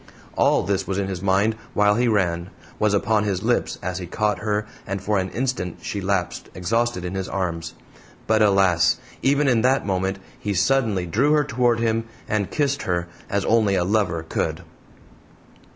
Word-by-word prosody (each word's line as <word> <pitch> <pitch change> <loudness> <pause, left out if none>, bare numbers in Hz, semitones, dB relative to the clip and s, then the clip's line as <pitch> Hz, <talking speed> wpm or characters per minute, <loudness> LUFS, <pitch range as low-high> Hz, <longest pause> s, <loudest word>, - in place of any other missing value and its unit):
All - - +3
this 95 -1 -1
was 95 - -2
in 100 -1 -1
his 90 -2 -4
mind 100 +3 +2 0.2
while 105 0 +4
he 120 +3 +2
ran, 90 -5 +1 0.3
was 105 -1 +3
upon 105 +1 +2
his 100 -3 -1
lips - - 0
as 90 +1 -3
he 90 - -6
caught 105 +1 0
her 105 0 -1 0.2
and 100 +1 -2
for 100 +1 0
an 95 0 -2
instant 120 -7 -2
she 100 - -3
lapsed, 95 -2 -2
exhausted, 115 +1 0
in 90 - -4
his 95 -1 -3
arms. 85 -4 -3 0.5
But, 110 0 +2
alas! 95 -5 +4 0.2
even 140 +1 +3
in 120 -4 +3
that 130 0 +2
moment 95 0 -1 0.2
he 105 -1 -2
suddenly 105 -2 +2
drew 125 - +2
her 150 -1 +4
toward 120 -2 +1
him, 115 0 0 0.2
and 105 -2 0
kissed 140 -2 0
her 85 -1 -2 0.2
as 100 0 0
only 110 -3 +3
a 90 - +2
lover 90 -4 0
could! 80 - -2
100 Hz, 180 wpm, -23 LUFS, 95-115 Hz, 0.5 s, while